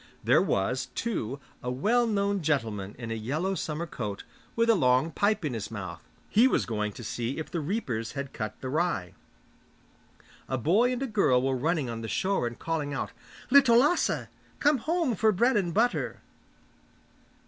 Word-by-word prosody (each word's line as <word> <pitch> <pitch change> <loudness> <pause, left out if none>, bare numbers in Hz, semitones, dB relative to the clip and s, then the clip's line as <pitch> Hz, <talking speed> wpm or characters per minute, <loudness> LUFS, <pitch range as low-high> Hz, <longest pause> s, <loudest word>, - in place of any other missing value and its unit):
There - - +5
was, 125 +7 0
too, 140 - -2 0.2
a 125 - -3
well 220 - +2
known 200 -2 0
gentleman 110 -10 -1
in 120 -2 -6
a - - 0
yellow 145 - -2
summer 160 -2 -3
coat, 105 -10 -5 0.3
with 230 0 +2
a 230 - +6
long 130 - +3
pipe 205 -1 +1
in 140 - -1
his 110 -3 -4
mouth; 95 -6 -6 0.3
he 230 +5 +5
was - - +1
going 105 -2 -2
to 120 - -9
see 120 +4 -3
if 160 - -5
the 170 - -1
reapers 140 - -2
had 140 -1 -5
cut 110 -1 -5
the 130 - -4
rye. 155 - -1 1.4
A 130 - 0
boy 200 - +3
and 250 +1 -2
a - - 0
girl 195 - +2
were 135 0 +1
running 150 +1 0
on 115 -1 -5
the 110 - -5
shore 190 - 0
and 120 - -7
calling 150 -3 -2
out, - - -3 0.4
'Little 265 -4 +7
Lasse! 295 +8 +2 0.3
Come 290 -2 +3
home 320 0 0
for 220 +1 +3
bread 235 +6 +2
and 185 -5 +1
butter! 230 +7 0
155 Hz, 180 wpm, -28 LUFS, -, 1.4 s, Little